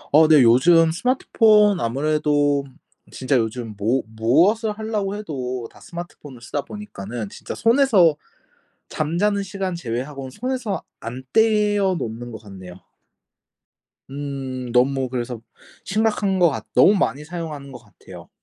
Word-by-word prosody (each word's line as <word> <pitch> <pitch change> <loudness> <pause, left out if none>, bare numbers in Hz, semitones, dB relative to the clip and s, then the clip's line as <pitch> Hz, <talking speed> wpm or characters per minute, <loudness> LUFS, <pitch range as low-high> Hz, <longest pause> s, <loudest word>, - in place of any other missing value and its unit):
어 155 0 +7
네. 150 -5 +6
요즘 160 +8 +5
스마트폰 210 -2 +3
아무래도 145 +2 +1 0.5
진짜 130 +1 -1
요즘 115 -1 -2
뭐 115 +6 0
무엇을 160 - +2
하려고 210 -2 -3
해도 130 - -5
다 - - -18
스마트폰을 170 -6 -10
쓰다 130 +4 -4
보니까는 120 - -7
진짜 - - -8
손에서 225 - +4 0.7
잠자는 190 +7 0
시간 195 -1 -4
제외하고는 135 -2 -5
손에서 250 - -3 0.2
안 125 +3 -7
떼어 210 -3 +2
놓는 120 0 -6
것 110 - -9
같네요. 95 -4 -11 1.4
음. 135 -3 -5
너무 130 +1 +2
그래서 120 -1 -4 0.5
심각한 210 -2 0
것 175 -2 +5
같 140 - -5
너무 200 - +6
많이 150 -6 -1
사용하는 155 -4 -7
것 125 - -10
같아요. 105 -4 -15
150 Hz, 285 characters per minute, -22 LUFS, 125-200 Hz, 1.4 s, 어